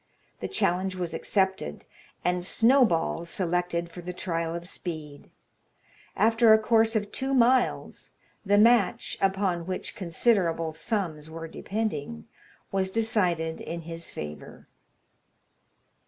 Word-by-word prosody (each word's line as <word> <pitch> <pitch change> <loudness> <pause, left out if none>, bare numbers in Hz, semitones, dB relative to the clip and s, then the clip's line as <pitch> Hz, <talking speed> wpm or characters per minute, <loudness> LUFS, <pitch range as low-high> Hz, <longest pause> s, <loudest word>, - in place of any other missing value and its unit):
The - - -3
challenge 185 - +1
was 175 -2 -3
accepted, 190 +3 -1 0.4
and 180 0 +1
Snowball 225 -7 +3
selected 170 -1 -1
for 175 - -9
the 180 +1 -5
trial 165 -2 -3
of 170 0 -6
speed; 155 -6 -7 0.9
after 225 +1 +4
a 220 - +9
course 225 +1 +3
of 205 -1 -1
two 270 +1 -1
miles, 250 0 +2 0.3
the 205 0 +3
match 225 -2 +3
(upon 190 -3 0
which 185 -1 -4
considerable 170 -3 +1
sums 160 -3 -3
were 165 0 -7
depending) 155 - -4 0.4
was 190 -1 0
decided 185 -7 0
in 170 0 -5
his 165 0 -7
favour. 75 0 -8
180 Hz, 115 wpm, -27 LUFS, 165-220 Hz, 0.9 s, a